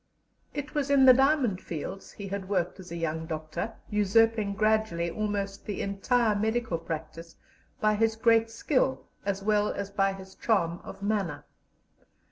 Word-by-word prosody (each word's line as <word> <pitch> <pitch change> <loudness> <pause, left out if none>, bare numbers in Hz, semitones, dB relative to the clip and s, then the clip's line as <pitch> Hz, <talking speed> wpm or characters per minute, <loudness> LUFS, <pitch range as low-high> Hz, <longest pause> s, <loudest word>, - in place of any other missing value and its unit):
It 290 0 -4
was 285 -2 -1
in 275 -2 +6
the 255 - +10
diamond 265 -7 +2
fields 175 +4 -6
he 200 - -7
had 195 -1 -4
worked 180 -2 -1
as 180 -2 -11
a - - -4
young 160 -1 -2
doctor, 155 +7 -4 0.2
usurping 210 0 +3
gradually 215 -5 +1
almost 200 -1 -3
the 205 - -3
entire 215 +3 +1
medical 220 -3 0
practice 165 +1 -7 0.4
by 215 -1 +3
his 225 +1 +2
great 225 0 +3
skill 260 +3 0 0.2
as 195 0 -1
well 210 0 +2
as 200 0 -5
by 195 -1 +1
his 190 0 -11
charm 175 -7 0
of 200 - -9
manner. 200 -6 -1
205 Hz, 155 wpm, -28 LUFS, 185-225 Hz, 0.4 s, the